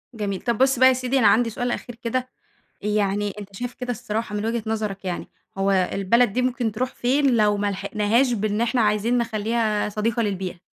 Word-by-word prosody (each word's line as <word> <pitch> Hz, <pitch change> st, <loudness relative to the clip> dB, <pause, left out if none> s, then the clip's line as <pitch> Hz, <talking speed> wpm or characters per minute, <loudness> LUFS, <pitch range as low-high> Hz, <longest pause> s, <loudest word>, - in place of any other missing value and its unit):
جميل. 200 Hz, -3 st, -3 dB
طب، 235 Hz, -2 st, -1 dB
بُص 265 Hz, -1 st, +3 dB
بقى، 260 Hz, -, +8 dB
يا 260 Hz, -, +6 dB
سيدي 255 Hz, +1 st, 0 dB
أنا 220 Hz, -, +5 dB
عندي 230 Hz, +3 st, +4 dB
سؤال 245 Hz, +2 st, -2 dB
أخير 240 Hz, -1 st, -5 dB
كده، 250 Hz, +2 st, -3 dB, 0.5 s
يعني 205 Hz, -1 st, 0 dB
أنت 200 Hz, -1 st, -10 dB
شايف 245 Hz, +3 st, -5 dB
كده 250 Hz, -1 st, -4 dB
الصراحة 220 Hz, -2 st, -3 dB
من 205 Hz, +1 st, -2 dB
وجهة 230 Hz, 0 st, -1 dB
نظرك 210 Hz, -3 st, -3 dB
يعني، 180 Hz, -1 st, -3 dB, 0.3 s
هو 195 Hz, 0 st, +1 dB
البلد 195 Hz, +4 st, +2 dB
دي 250 Hz, -, +1 dB
ممكن 250 Hz, -3 st, 0 dB
تروح 250 Hz, +4 st, -2 dB
فين 265 Hz, +1 st, +2 dB
لو 210 Hz, -1 st, +3 dB
ملحقناهاش 210 Hz, +5 st, +1 dB
بإن 215 Hz, 0 st, -1 dB
إحنا 240 Hz, +1 st, +1 dB
عايزين 215 Hz, +3 st, +2 dB
نخليها 220 Hz, -2 st, 0 dB
صديقة 215 Hz, +2 st, -1 dB
للبيئة؟ 190 Hz, -4 st, -3 dB
220 Hz, 190 wpm, -23 LUFS, 205-245 Hz, 0.5 s, بقى